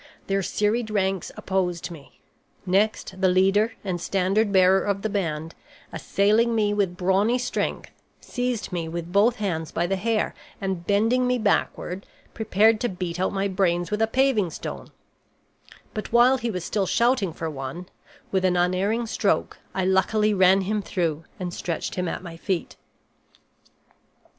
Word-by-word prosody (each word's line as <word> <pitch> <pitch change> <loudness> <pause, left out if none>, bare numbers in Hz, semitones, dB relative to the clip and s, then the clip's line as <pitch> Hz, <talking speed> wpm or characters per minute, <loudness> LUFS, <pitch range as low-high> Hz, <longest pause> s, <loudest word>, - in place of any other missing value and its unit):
Their 195 0 0
serried 215 +4 0
ranks 195 -3 -1
opposed 180 -2 -2
me. 150 -5 -13 0.5
Next, 190 0 0
the 190 - +5
leader 195 +4 +3
and 180 -4 -3
standard 195 +4 +1
bearer 190 0 +5
of 200 -1 -1
the 220 - -1
band, 165 -5 -2 0.4
assailing 220 +4 +2
me 210 -2 +2
with 195 -4 0
brawny 195 +6 +2
strength, 245 - -3 0.3
seized 245 -4 -3
me 170 -2 -3
with 170 +1 -5
both 210 +5 +4
hands 170 -8 -3
by 170 - 0
the 195 +2 -1
hair, 220 +2 0 0.3
and 190 -3 -3
bending 225 +5 +2
me 250 0 +2
backward, 200 -3 -1 0.3
prepared 220 0 +3
to 245 - +1
beat 180 -2 -4
out 185 - +1
my 195 0 0
brains 175 -3 0
with 210 +1 -1
a 225 - +4
paving 245 -6 +2
stone; - - -7 1.1
but 215 -2 -5
while 245 +3 +5
he 235 -1 -2
was 180 -5 -4
still 200 -3 -1
shouting 235 -5 +2
for 165 +1 -5
one, 145 +4 -6 0.4
with 190 -1 +1
an 180 -1 +2
unerring 190 +6 +1
stroke 215 -2 0 0.2
I 190 -1 0
luckily 210 +3 +2
ran 190 0 +5
him 210 +2 -1
through 165 -5 -2
and 180 -2 -4
stretched 170 -2 -3
him 180 -1 -2
at - - -4
my 170 -2 -8
feet. 185 0 -3
195 Hz, 155 wpm, -24 LUFS, 180-215 Hz, 1.1 s, the